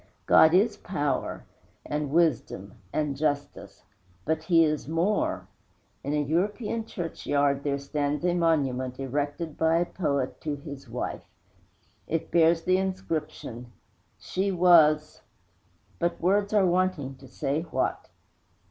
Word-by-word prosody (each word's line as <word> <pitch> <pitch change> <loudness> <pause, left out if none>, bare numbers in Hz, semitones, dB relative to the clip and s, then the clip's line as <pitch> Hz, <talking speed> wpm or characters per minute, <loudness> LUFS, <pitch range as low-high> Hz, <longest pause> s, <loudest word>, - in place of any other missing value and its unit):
God 160 +2 +6
is 205 +3 +3
Power 145 -7 -2 0.4
and 150 -1 -2
Wisdom 135 - 0 0.2
and 150 -2 -1
Justice 145 0 -3 0.4
but 160 0 0
He 165 -3 +5
is 155 -3 -1
more. 170 +7 0 0.6
In 140 - -3
a - - +1
European 210 - -1
churchyard 145 -6 -1
there 140 -1 0
stands 145 +2 -2
a 175 - +2
monument 135 -7 0
erected 145 +4 -3
by 160 0 +3
a 175 - +2
poet 140 -8 -2
to 150 -2 -2
his 140 -2 -10
wife. 120 +2 -5 0.8
It 165 0 -2
bears 165 0 +4
the 185 0 +3
inscription: 165 -10 -4 0.5
She 195 +2 -2
was, 165 -4 +4 0.8
But 170 0 -1
words 200 +3 +2
are 205 -3 +4
wanting 175 -7 0
to 135 - -14
say 140 +4 -2
what! 165 - -2
155 Hz, 125 wpm, -27 LUFS, 140-175 Hz, 0.8 s, God